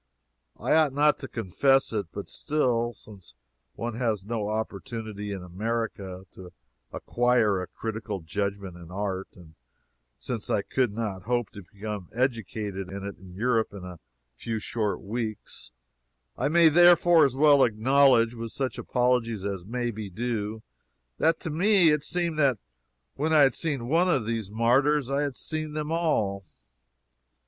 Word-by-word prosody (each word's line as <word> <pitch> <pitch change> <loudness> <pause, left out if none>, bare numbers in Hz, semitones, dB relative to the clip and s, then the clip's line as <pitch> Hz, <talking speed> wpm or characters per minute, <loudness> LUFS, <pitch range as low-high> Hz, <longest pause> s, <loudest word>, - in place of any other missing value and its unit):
I - - +1
ought 155 -3 +4
not 150 +1 +3
to 135 - -6
confess 135 +5 +1
it, 105 -4 -2
but 100 - -7
still, 120 -6 0
since 95 - -15 0.4
one 120 0 -4
has 110 -6 -1
no 110 -2 -2
opportunity 110 -1 -4
in 95 -2 -5
America 95 -1 -4
to 90 -1 -12 0.4
acquire 120 -5 +1
a 90 - -5
critical 110 -3 -5
judgment 100 +2 -4
in 85 -1 -12
art, 95 0 -3
and 85 -4 -15 0.6
since 120 -4 -5
I 100 - +1
could 125 -1 0
not 105 -3 -4
hope 120 -1 -1
to 100 - -10
become 105 -2 -6
educated 110 -6 -2
in 100 +1 -6
it 100 -2 -7
in 90 -1 -13
Europe 115 0 0
in 95 - -8
a 90 -2 -9 0.3
few 115 - -4
short 105 -1 -2
weeks, 110 0 -5 0.7
I - - 0
may 165 +2 +6
therefore 175 0 +6
as 135 -3 +2
well 145 -1 +6
acknowledge 120 +1 +4
with 115 -1 -7
such 135 -2 -3
apologies 120 -5 0
as 95 -3 -4
may 120 +2 -2
be 105 -2 -6
due, 110 +1 -3 0.6
that 165 0 +3
to 160 - -4
me 180 0 +4
it 150 -1 +1
seemed 170 -2 -1
that 135 -5 +3 0.6
when 155 +3 0
I 155 - +6
had 135 -3 +5
seen 140 -8 -2
one 170 +6 +3
of 130 -10 +1
these 115 -3 -3
martyrs 130 +5 +2
I 140 +1 +1
had 140 -3 -2
seen 155 -1 -4
them 150 0 -3
all. 110 -13 0
115 Hz, 155 wpm, -27 LUFS, 100-140 Hz, 0.7 s, may